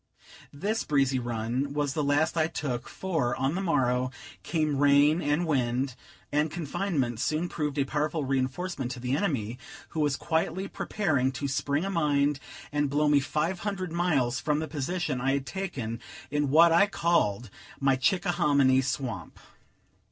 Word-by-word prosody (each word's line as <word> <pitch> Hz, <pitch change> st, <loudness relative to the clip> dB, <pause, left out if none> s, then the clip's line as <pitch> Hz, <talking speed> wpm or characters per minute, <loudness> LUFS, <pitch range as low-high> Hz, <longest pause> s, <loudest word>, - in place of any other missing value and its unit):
This 205 Hz, +10 st, -2 dB
breezy 135 Hz, -3 st, +2 dB
run 120 Hz, +3 st, -2 dB
was 145 Hz, -2 st, 0 dB
the 150 Hz, -, -1 dB
last 145 Hz, +4 st, +2 dB
I 160 Hz, -1 st, +2 dB
took; 130 Hz, -7 st, -4 dB
for, 160 Hz, -10 st, -1 dB
on 135 Hz, +3 st, 0 dB
the 190 Hz, -, -2 dB
morrow, 130 Hz, -7 st, +1 dB, 0.3 s
came 155 Hz, -4 st, 0 dB
rain 145 Hz, +3 st, +5 dB
and 150 Hz, +3 st, +1 dB
wind: 130 Hz, -3 st, 0 dB, 0.4 s
and 150 Hz, +2 st, +2 dB
confinement 145 Hz, -, -2 dB
soon 155 Hz, +7 st, 0 dB
proved 150 Hz, -4 st, -3 dB
a 140 Hz, -, +2 dB
powerful 150 Hz, +1 st, -1 dB
reinforcement 135 Hz, +2 st, -2 dB
to 125 Hz, -, -8 dB
the 125 Hz, +2 st, -1 dB
enemy, 130 Hz, -, -1 dB, 0.3 s
who 160 Hz, -, -5 dB
was 145 Hz, -2 st, +2 dB
quietly 165 Hz, +5 st, -1 dB
preparing 150 Hz, -15 st, 0 dB
to 140 Hz, +1 st, -3 dB
spring 140 Hz, +4 st, 0 dB
a 195 Hz, -, -2 dB
mine, 145 Hz, -4 st, +2 dB, 0.3 s
and 145 Hz, -1 st, +1 dB
blow 150 Hz, +2 st, +2 dB
me 145 Hz, -1 st, +5 dB
five 155 Hz, +6 st, -1 dB
hundred 195 Hz, -4 st, -3 dB
miles 155 Hz, -8 st, +1 dB
from 150 Hz, -1 st, 0 dB
the 155 Hz, +1 st, -2 dB
position 150 Hz, -1 st, -2 dB
I 135 Hz, +1 st, +2 dB
had 140 Hz, -1 st, -1 dB
taken 135 Hz, -, -4 dB, 0.3 s
in 145 Hz, -1 st, +1 dB
what 165 Hz, +4 st, +7 dB
I 175 Hz, +5 st, +5 dB
called 120 Hz, -, +1 dB, 0.3 s
my 135 Hz, -1 st, +3 dB
Chickahominy 145 Hz, -3 st, +3 dB
Swamp. 130 Hz, -2 st, -4 dB
145 Hz, 160 wpm, -28 LUFS, 130-165 Hz, 0.4 s, what